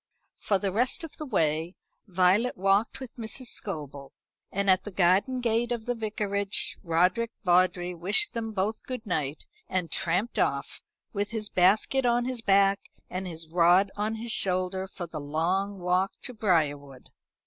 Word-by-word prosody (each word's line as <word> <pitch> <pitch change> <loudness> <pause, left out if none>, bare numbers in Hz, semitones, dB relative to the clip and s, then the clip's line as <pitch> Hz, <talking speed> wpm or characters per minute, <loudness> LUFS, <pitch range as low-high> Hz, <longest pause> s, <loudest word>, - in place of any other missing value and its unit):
For 200 - +1
the 195 0 -2
rest 245 - 0
of 325 - -9
the 305 - -6
way 160 - 0 0.3
Violet 190 +6 +2
walked 195 +5 +2
with 260 -3 -9
Mrs. 230 +2 -4
Scobel, 145 -7 -5 0.4
and 200 +1 -1
at 185 -1 +4
the - - -6
garden 195 +7 +2
gate 235 0 0
of 235 -2 -3
the 245 - 0
Vicarage 205 -3 -2
Roderick 180 +6 +2
Vawdrey 180 -1 +2
wished 195 - +2
them 225 -2 -3
both 210 +2 -2
good 250 -3 -5
night, 150 -6 -2 0.2
and 180 -3 -2
tramped 190 +5 0
off, - - -1 0.3
with 205 -1 -1
his 215 -2 -3
basket 205 +9 +3
on 240 0 +2
his 255 -2 -3
back 195 -1 +3 0.2
and 185 +1 -4
his 165 -2 -7
rod 180 +3 +4
on 215 +2 -1
his 230 +1 -5
shoulder, 185 0 +1
for 185 -2 -7
the 160 -2 -7
long 180 +7 -1
walk 180 +1 +1
to 250 - -3
Briarwood. 145 - -1
195 Hz, 160 wpm, -27 LUFS, 180-220 Hz, 0.4 s, at